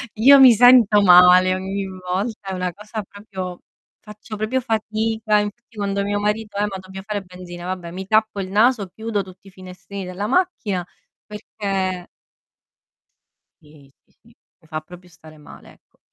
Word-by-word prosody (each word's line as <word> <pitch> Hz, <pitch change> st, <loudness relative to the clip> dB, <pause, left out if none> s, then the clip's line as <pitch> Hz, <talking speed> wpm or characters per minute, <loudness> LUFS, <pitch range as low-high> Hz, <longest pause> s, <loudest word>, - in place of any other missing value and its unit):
Io 275 Hz, +6 st, +7 dB
mi 255 Hz, -3 st, +9 dB
sento 230 Hz, -3 st, +6 dB
male 180 Hz, 0 st, +7 dB
ogni 195 Hz, +1 st, -4 dB
volta, 190 Hz, +3 st, -5 dB
è 190 Hz, -, -3 dB
una 180 Hz, -1 st, -3 dB
cosa 210 Hz, +1 st, -7 dB
proprio 190 Hz, -3 st, -8 dB, 0.4 s
faccio 210 Hz, +1 st, -10 dB
proprio 235 Hz, +5 st, -1 dB
fatica, 220 Hz, -1 st, -1 dB
infatti 220 Hz, +3 st, -6 dB
quando 200 Hz, -1 st, -2 dB
mio 205 Hz, 0 st, -1 dB
marito: 210 Hz, 0 st, -3 dB
"Eh 205 Hz, -, +1 dB
ma 195 Hz, -2 st, -6 dB
dobbia 190 Hz, +1 st, -10 dB
fare 205 Hz, 0 st, -4 dB
benzina", 180 Hz, -1 st, -11 dB
vabbè 180 Hz, -2 st, -5 dB
mi 190 Hz, +2 st, -7 dB
tappo 215 Hz, 0 st, +1 dB
il 185 Hz, -, -4 dB
naso, 215 Hz, 0 st, +2 dB
chiudo 220 Hz, +1 st, -4 dB
tutti 185 Hz, +1 st, -16 dB
i -, -, -12 dB
finestrini 185 Hz, +1 st, -10 dB
della 185 Hz, +3 st, -5 dB
macchina 230 Hz, -, -1 dB, 0.4 s
perché 195 Hz, -3 st, -4 dB, 1.6 s
Sì, 150 Hz, -2 st, -19 dB, 0.2 s
sì, -, -, -40 dB
sì, -, -, -35 dB, 0.3 s
mi 160 Hz, -, -24 dB
fa 155 Hz, -1 st, -5 dB
proprio 180 Hz, +3 st, -15 dB
stare 160 Hz, -2 st, -17 dB
male, 150 Hz, -, -15 dB
ecco. -, -, -35 dB
200 Hz, 160 wpm, -21 LUFS, 185-215 Hz, 1.6 s, mi